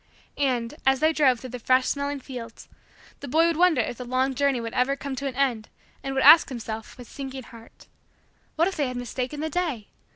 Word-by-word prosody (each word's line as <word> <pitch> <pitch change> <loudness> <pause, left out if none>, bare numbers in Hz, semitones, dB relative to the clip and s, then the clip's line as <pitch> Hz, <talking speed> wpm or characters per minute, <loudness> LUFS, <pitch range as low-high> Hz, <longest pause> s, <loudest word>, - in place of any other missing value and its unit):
And, 250 -4 0
as 265 0 +3
they 315 +1 +3
drove 265 -6 +3
through 255 0 -9
the 250 - -6
fresh 255 +2 +3
smelling 280 0 -2
fields, 245 -4 -9 0.5
the 285 - -8
boy 320 +5 +3
would 335 -1 +1
wonder 340 -5 +4
if 225 - -4
the - - -4
long 255 +2 0
journey 275 -1 +1
would 230 -1 -5
ever 260 +2 +1
come 275 -1 -5
to 275 - -3
an 260 - -5
end 245 -5 0 0.3
and 270 0 -4
would 270 - +1
ask 325 - +8
himself, 225 -3 -7
with 245 -2 -11
sinking 270 -1 -7
heart: 230 0 -15 0.7
"What 330 +2 +3
if 390 - -3
they 290 -3 +1
had 250 0 -5
mistaken 255 +4 -4
the 315 - -2
day? 300 - -2
265 Hz, 220 wpm, -25 LUFS, 245-285 Hz, 0.7 s, ask